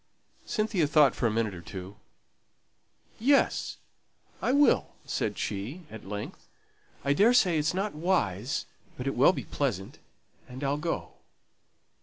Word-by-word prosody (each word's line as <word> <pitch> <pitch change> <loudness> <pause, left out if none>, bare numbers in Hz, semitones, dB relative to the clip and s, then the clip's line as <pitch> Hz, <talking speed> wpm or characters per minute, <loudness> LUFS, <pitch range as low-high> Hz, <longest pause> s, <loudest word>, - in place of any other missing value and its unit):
Cynthia 210 -7 +1
thought 145 -3 +5
for 120 - 0
a - - 0
minute 110 -2 0
or 85 - -8
two. 95 +2 -8 1.2
"Yes, 275 +5 +2 0.6
I - - +1
will," 285 +2 +3
said - - -2
she, 115 - -4
at 110 -3 -10
length. 105 0 -6 0.6
"I 140 - +4
daresay 195 -3 +4
it's 150 +4 0
not 200 +2 -1
wise; 145 - 0 0.3
but 125 - -5
it 135 - 0
will 135 +7 +6
be - - -5
pleasant, 110 -10 -3 0.5
and 130 +3 -7
I'll 140 +1 +1
go. 165 +2 -3
140 Hz, 135 wpm, -28 LUFS, -, 1.2 s, will